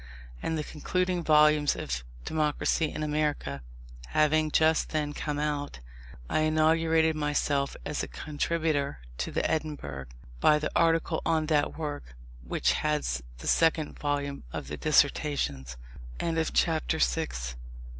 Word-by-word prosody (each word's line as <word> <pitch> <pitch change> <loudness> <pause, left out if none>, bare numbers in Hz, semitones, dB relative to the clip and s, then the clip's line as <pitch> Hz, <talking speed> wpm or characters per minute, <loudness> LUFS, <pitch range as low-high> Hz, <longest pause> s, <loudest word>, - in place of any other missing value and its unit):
And 160 - -1
the 155 - -2
concluding 180 +4 -1
volumes 150 -1 +5
of - - -4 0.2
Democracy 155 0 0
in 155 - -4
America, 150 - -1 0.5
having 155 0 +2
just 160 +1 +3
then 150 -2 -1
come 150 0 -3
out, 145 - -2 0.5
I - - +1
inaugurated 160 +1 +3
myself 145 -2 0
as 150 - -2
a - - -3
contributor 155 - -1 0.2
to 70 - -2
the - - 0
Edinburgh, 140 - -3 0.3
by 150 - +5
the 150 0 -2
article 165 -1 +2
on 160 -1 +1
that 150 -2 +1
work, 145 - -5 0.3
which 65 - +1
heads 150 - -1 0.2
the - - -8
second 160 -2 +2
volume 145 -1 -2
of 65 - -6
the 75 - -4
Dissertations. 140 - +1 0.4
CHAPTER 160 -1 +1
VII. 160 0 +1
150 Hz, 125 wpm, -28 LUFS, 145-160 Hz, 0.5 s, volumes